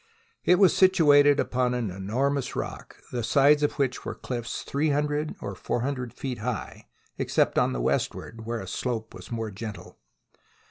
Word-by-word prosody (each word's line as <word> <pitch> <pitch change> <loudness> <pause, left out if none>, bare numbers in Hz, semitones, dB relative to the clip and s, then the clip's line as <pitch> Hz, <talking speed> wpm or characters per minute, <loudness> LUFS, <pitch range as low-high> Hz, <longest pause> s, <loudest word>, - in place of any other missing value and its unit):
It 180 - +5
was 190 -1 +5
situated 145 -6 +6
upon 125 0 +1
an 115 -6 -2
enormous 125 +9 -1
rock, - - -6
the 125 - -2
sides 140 +5 +4
of 145 - +1
which 130 -3 -1
were - - -5
cliffs 120 -3 -5
three 150 +3 0
hundred 150 +1 0
or 100 - -5
four 105 +5 -2
hundred 125 -2 -3
feet 130 -4 -5
high, 115 +1 -5 0.3
except - - +2
on - - +2
the 60 -1 -2
westward, 115 - -2
where 115 0 -3
the - - -7
slope 110 +3 -3
was 90 -1 -11
more 115 -2 -3
gentle. 105 +1 -8
125 Hz, 170 wpm, -26 LUFS, 115-145 Hz, 0.3 s, situated